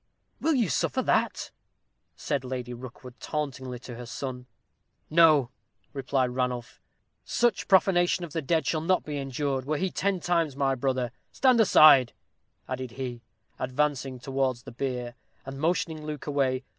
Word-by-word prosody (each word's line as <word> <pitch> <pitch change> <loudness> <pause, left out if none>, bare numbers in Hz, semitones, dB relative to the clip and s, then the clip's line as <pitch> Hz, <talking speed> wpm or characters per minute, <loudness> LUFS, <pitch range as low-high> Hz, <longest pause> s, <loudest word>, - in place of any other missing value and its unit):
"Will 320 -1 +2
you 235 -6 +2
suffer - - 0
that?" - - 0 0.6
said 140 -2 -2
Lady 125 -1 -5
Rookwood, 125 0 -11
tauntingly, 130 -3 -4
to 125 - -8
her 120 -1 -8
son. 125 0 -6 0.6
"No," 155 -6 +5 0.4
replied 130 -2 0
Ranulph; 125 -1 -3 0.4
"such 240 -4 0
profanation 180 -2 +3
of 155 - -12
the 165 - -1
dead 160 +3 0
shall 155 - 0
not 185 +3 +1
be 150 -1 -4
endured, 135 -1 -2
were 150 +2 -1
he 190 +3 -1
ten 195 -1 0
times 170 -5 0
my 135 -1 +1
brother. 130 -1 -1 0.2
Stand 255 -3 +3
aside," 150 - +7 0.5
added 130 -2 -5
he, 125 -2 -5 0.4
advancing 135 0 -1
towards 130 -2 -2
the - - -10
bier, 125 -1 -4 0.3
and 135 0 -7
motioning 160 -1 -1
Luke 150 -2 -6
away. 135 -3 0
135 Hz, 145 wpm, -27 LUFS, 125-155 Hz, 0.6 s, aside